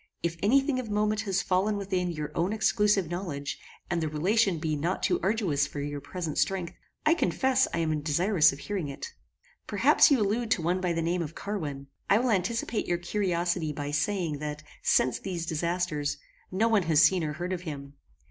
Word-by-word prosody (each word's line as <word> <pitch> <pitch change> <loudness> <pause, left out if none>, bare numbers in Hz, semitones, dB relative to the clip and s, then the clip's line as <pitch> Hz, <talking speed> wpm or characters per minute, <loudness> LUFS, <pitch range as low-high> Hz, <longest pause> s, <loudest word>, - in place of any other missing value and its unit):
If 170 0 -1
any 250 +8 +5
thing 270 -1 -1
of 240 -4 -5
moment 210 +1 +1
has 195 0 +1
fallen 195 +3 +1
within 185 -3 -1
your 150 -3 -4
own 175 +5 0
exclusive 210 -4 +2
knowledge, 150 -5 -4 0.3
and 175 -2 -1
the 160 - 0
relation 185 +5 +2
be 155 -1 -1
not 170 +6 -2
too - - +2
arduous 185 -9 +1
for 145 - -7
your 145 0 -4
present 165 -3 -4
strength, 185 -3 0 0.3
I 310 - +6
confess 265 -6 +2
I - - -2
am 155 -2 0
desirous 160 +2 +3
of 135 - -8
hearing 190 0 -3
it. 305 - -7 0.5
Perhaps - - +5
you 280 -4 +4
allude 220 +3 0
to 175 - +1
one 180 +3 0
by 180 -2 0
the 165 -1 -1
name 175 +2 0
of 165 -1 -5
Carwin. 150 -10 -4 0.2
I 200 - +6
will 245 +1 +1
anticipate 220 +3 -1
your 175 - +1
curiosity 175 -3 -1
by 145 0 -4
saying, 150 0 -1
that 150 0 -5 0.2
since 130 - +2
these 175 -4 -4
disasters, 165 -2 -1 0.3
no 215 +5 +2
one 220 -3 +3
has 155 -1 +5
seen 185 -3 +4
or 150 -1 -2
heard 175 +4 -3
of 180 - -4
him. 140 -5 -7
175 Hz, 195 wpm, -28 LUFS, 155-205 Hz, 0.5 s, I